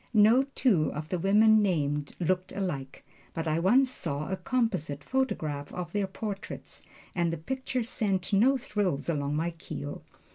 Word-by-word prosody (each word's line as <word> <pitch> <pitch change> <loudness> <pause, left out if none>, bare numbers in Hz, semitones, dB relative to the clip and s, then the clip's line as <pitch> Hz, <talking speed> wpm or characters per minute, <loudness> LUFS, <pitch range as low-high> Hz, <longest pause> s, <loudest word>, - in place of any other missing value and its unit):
No 225 +5 +6
two 190 - +3
of 155 +1 -5
the 180 - -1
women 215 +4 +5
named 150 -7 0
looked 185 +2 0
alike, 145 -9 -4 0.3
but 165 0 -2
I 155 +1 +1
once 250 +9 +4
saw 150 - -3
a - - +1
composite 185 - -1
photograph 155 - -1
of 180 -3 -5
their 205 -2 0
portraits 200 0 -6 0.3
and 170 -2 +1
the 165 - -3
picture 255 +7 -3
sent 205 -5 -1
no 250 +7 +5
thrills 205 - -1
along 145 -2 0
my 165 +3 0
keel. 155 -3 -7
185 Hz, 155 wpm, -29 LUFS, 155-215 Hz, 0.3 s, No